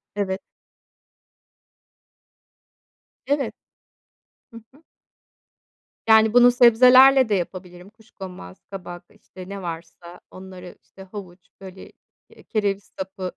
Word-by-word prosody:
Evet. 195 -1 -3 2.8
Evet. 280 0 -2 1.0
Hı 230 - -13 0.2
hı. 290 - -23 1.3
Yani, 220 0 +5
bunu 245 0 +6
sebzelerle 255 +2 +6
de 205 - +1
yapabilirim. 180 0 -7
Kuşkonmaz, 190 - -13
kabak, 175 -2 -9
işte 185 0 -14
ne 200 0 -7
varsa, 170 0 -9
onları, 185 -1 -12
işte, 190 - -16
havuç 185 -2 -12
böyle, 190 -1 -12 0.4
eee, - - -19
kereviz 200 -2 -2 0.2
sapı, 190 -1 -6
195 Hz, 95 wpm, -22 LUFS, 180-220 Hz, 2.8 s, bunu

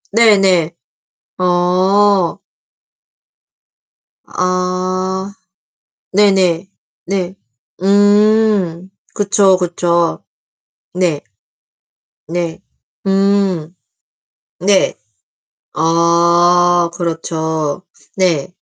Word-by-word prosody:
네네. 195 -7 +4 0.7
어. 185 +1 +2 1.9
아. 185 +1 -2 0.8
네네. 190 -3 +2 0.4
네. 190 -1 -3 0.5
음. 205 -2 +2 0.2
그쵸, 200 -1 +3
그쵸. 170 -1 -1 0.7
네. 175 -5 0 1.1
네. 170 -1 -4 0.5
음. 195 -4 0 0.8
네. 190 +2 +2 0.8
아 170 +1 +2
그렇죠. 160 -2 -3 0.3
네. 175 -7 0
180 Hz, 70 characters per minute, -15 LUFS, 170-195 Hz, 1.9 s, 네네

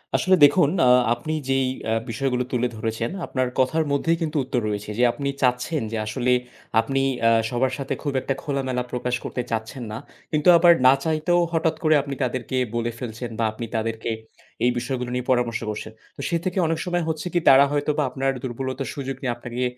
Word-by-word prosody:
আসলে 185 0 +4
দেখুন, 145 0 +4 0.2
আ - - +6 0.2
আপনি 120 +7 -4 0.2
যেই 135 0 +2 0.3
আ - - +3 0.2
বিষয়গুলো 125 +2 -1
তুলে 125 -1 +1
ধরেছেন 110 +1 -2 0.2
আপনার 130 -1 -1
কথার 155 +5 +2
মধ্যেই 165 +4 +1
কিন্তু 155 -1 -1
উত্তর 125 -1 -1
রয়েছে, 105 0 -4
যে - - +4
আপনি 140 -1 -3
চাচ্ছেন 125 +4 +1
যে 115 - -2
আসলে 120 +4 0 0.5
আপনি 135 +4 -1 0.3
আ - - +6 0.2
সবার 130 +1 0
সাথে 135 0 -3
খুব 145 -2 -2
একটা 135 - -1
খোলামেলা 130 -3 -1
প্রকাশ 125 0 -1
করতে 125 - -3
চাচ্ছেন 115 +3 -3
না। 110 - -4 0.3
কিন্তু 150 +1 0
আবার 170 0 +7
না 130 - +8
চাইতেও 160 +2 +1
হঠাৎ 165 0 +1
করে 155 -1 +5
আপনি 140 0 -5
তাদেরকে 130 0 -2 0.2
বলে 120 0 -1
ফেলছেন 120 0 -5
বা 115 - +2
আপনি 110 +2 -6
তাদেরকে 115 0 -2 0.5
এই 125 - +4
বিষয়গুলো 125 0 -3
নিয়ে 125 0 -3
পরামর্শ 120 -3 +1
করছেন। 105 +1 -5 0.2
তো - - -8
সে 170 - +1
থেকে 185 +1 -2
অনেক 160 0 -1
সময় 175 -1 0
হচ্ছে 160 +2 -3
কি 175 - +3
তারা 135 +1 +8
হয়তোবা 145 +1 0
আপনার 135 +1 -1
দুর্বলতার 130 +1 -4
সুযোগ 135 -1 -4
নিয়ে 125 -3 -1
আপনাকে 120 +1 -4
130 Hz, 190 wpm, -23 LUFS, 120-145 Hz, 0.5 s, না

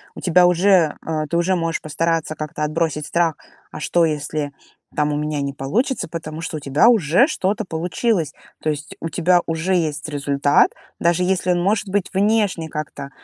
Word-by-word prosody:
у - - -8
тебя 180 0 +5
уже, 180 -2 +4
э, 155 -1 -1
ты 170 - 0
уже 185 +2 +2
можешь 165 -1 -1
постараться 165 0 -1
как-то 150 0 -5
отбросить 150 -1 -1
страх: 170 -2 +1 0.4
"А 155 - -7
что 170 +2 +2
если 150 -1 -2 0.4
там 150 0 +1
у 145 - -1
меня 150 -1 -2
не 140 -1 -3
получится?"- 205 - -1
потому 160 -1 -6
что 165 -1 -4
у - - -5
тебя 140 +10 +3
уже 210 - +4
что-то 195 - -1
получилось. 170 - -1 0.3
То 155 - -1
есть 150 0 -4
у 165 - -3
тебя 175 +2 +3
уже 165 +3 -1
есть 155 -3 -1
результат, 145 0 +2 0.3
даже 170 +1 +2
если 185 -1 +1
он 175 0 +1
может 205 +2 +1
быть 200 -1 0
внешне 200 -4 +1
как-то, 145 -2 -6
165 Hz, 180 wpm, -21 LUFS, 150-180 Hz, 0.4 s, тебя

